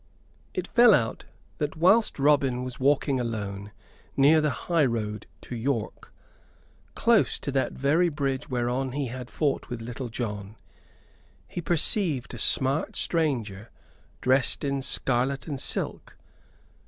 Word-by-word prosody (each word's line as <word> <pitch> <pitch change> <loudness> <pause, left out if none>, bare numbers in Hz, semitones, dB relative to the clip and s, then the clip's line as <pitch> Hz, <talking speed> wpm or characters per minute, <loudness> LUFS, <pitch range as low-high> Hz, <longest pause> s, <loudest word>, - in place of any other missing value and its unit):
It - - -2
fell 240 -3 +6
out 115 -5 -2 0.3
that 150 -1 -2
whilst 195 +7 +4
Robin 135 -3 +2
was 130 -1 -7
walking 135 0 +2
alone 105 -4 -4 0.5
near 150 +3 +6
the 150 - +2
highroad 115 - -1
to 125 - -7
York, 115 -1 -3 0.8
close 235 -2 +3
to 140 - -5
that 135 -1 0
very 160 +6 +2
bridge 140 -3 -2
whereon 125 +1 -1
he 140 -3 -2
had 125 0 -7
fought 145 -3 -1
with 120 -2 -4
Little 120 +2 -6
John, 105 -3 -5 0.9
he 175 - -5
perceived 165 - +1
a 120 - -7
smart 135 +6 +1
stranger 115 - -1 0.5
dressed 130 0 +2
in 140 -1 -1
scarlet 130 0 0
and 140 -4 -4
silk. - - -2
135 Hz, 130 wpm, -26 LUFS, 120-150 Hz, 0.9 s, fell